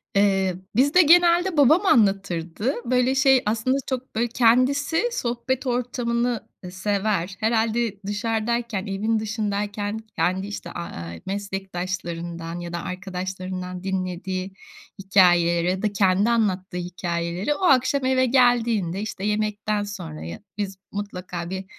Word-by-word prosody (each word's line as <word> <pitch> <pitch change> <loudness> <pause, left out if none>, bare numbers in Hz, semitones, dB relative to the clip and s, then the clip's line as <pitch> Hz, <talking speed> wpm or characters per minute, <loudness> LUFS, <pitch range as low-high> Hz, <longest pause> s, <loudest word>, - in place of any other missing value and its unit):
Eee, 195 -2 +3 0.2
bizde 285 +9 +5
genelde 345 +1 +5
babam 305 +8 +5
anlatırdı. 195 - +1
Böyle 250 +2 +2
şey 265 -2 +5
aslında 225 +5 +1
çok 260 -2 -4
böyle 235 +2 +1
kendisi 255 - +3
sohbet 260 - -2
ortamını 240 -1 -1 0.2
sever. 195 -1 -1
Herhâlde 225 -1 0
dışarıdayken 225 0 -1
evin 215 +3 0
dışındayken 210 -1 -2 0.2
kendi 190 +2 0
işte, 205 - -7
aaa, 85 - -6
meslektaşlarından 180 -4 -4
ya 170 0 -7
da 170 - -3
arkadaşlarından 185 0 -5
dinlediği 185 0 -3 0.5
hikâyeleri 175 -3 +4
ya 185 +1 -1
da 210 -1 0
kendi 195 +2 +3
anlattığı 190 -6 0
hikâyeleri 175 +4 -2
o - - -9
akşam 275 -2 +3
eve 260 0 +3
geldiğinde 235 -7 +2
işte 210 -2 -5
yemekten 210 0 -1
sonraya 85 - -7 0.2
biz 195 -2 -3
mutlaka 180 -4 -5
bir, 190 +1 -5
205 Hz, 115 wpm, -24 LUFS, 185-240 Hz, 0.5 s, bizde